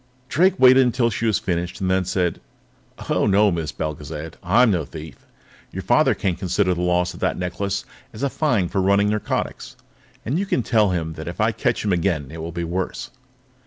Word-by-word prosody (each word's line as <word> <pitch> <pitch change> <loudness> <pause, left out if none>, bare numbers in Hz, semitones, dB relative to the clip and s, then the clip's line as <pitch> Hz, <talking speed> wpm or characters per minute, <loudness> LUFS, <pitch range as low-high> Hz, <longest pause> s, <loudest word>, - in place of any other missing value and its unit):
Drake 185 +5 +3
waited 130 +1 +7
until 120 -1 +1
she 115 +2 -1
had 110 - +2
finished, 90 +1 -2
and 95 -2 0
then 95 0 +1
said: 90 -2 -1 0.7
"Oh, - - +1
no, 105 +1 +4
Miss 80 -3 -2
Belgezad; 75 +1 -5
I'm 110 +6 +4
no 85 -5 0
thief. 75 +1 -11 0.4
Your - - -6
father - - +3
can 95 -3 -1
consider 90 +1 0
the 90 - -3
loss 90 0 +1
of 90 - -11
that - - 0
necklace 95 +2 -3 0.3
as 110 - -8
a 140 - +2
fine 120 - +1
for 95 - -1
running 100 +2 +3
narcotics. 105 0 -3 0.5
And 140 +9 0
you 200 - -2
can 130 - 0
tell 110 -2 +3
him 80 -3 -2
that - - -8
if - - -6
I - - +3
catch - - -1
him 100 - +2
again, 85 -6 0
it 80 - -8
will 80 +1 -5
be 85 +1 -4
worse. 95 +9 -4
95 Hz, 200 wpm, -22 LUFS, 85-110 Hz, 0.7 s, waited